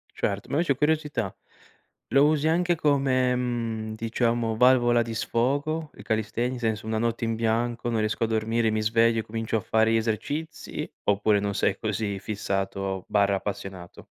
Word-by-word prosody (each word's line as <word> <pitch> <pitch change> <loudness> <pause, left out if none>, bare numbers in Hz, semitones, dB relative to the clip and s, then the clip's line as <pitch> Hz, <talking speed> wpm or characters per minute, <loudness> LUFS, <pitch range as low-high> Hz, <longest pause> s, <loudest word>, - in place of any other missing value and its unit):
Certo, 100 0 -2
ma - - -2
invece, 150 -3 +2
curiosità, 150 - 0 0.8
lo 140 +1 +5
usi 155 0 +2
anche 175 +2 +2
come, 135 -5 +2
mhmm, 115 -3 -2
diciamo, 115 0 0
valvola 120 -1 +5
di 115 -1 -4
sfogo 145 +8 -1
il - - -12
calisthenics? 110 +3 -1
Senso 110 -2 -1
una 110 0 -1
notte 115 0 -1
in 115 0 -1
bianco 115 +1 0
non 115 -2 0
riesco 110 +1 0
a - - -2
dormire, 110 +1 +1
mi 110 0 0
sveglio, 115 +1 +3
e - - -2
comincio 115 +1 -2
a - - -2
fare 110 +2 +2
gli - - +4
esercizi 130 +9 -3 0.2
oppure 105 +1 +3
non 100 0 -2
sei - - +1
così 100 -3 -2
fissato/appassionato? 95 -2 -2
115 Hz, 155 wpm, -26 LUFS, 110-125 Hz, 0.8 s, lo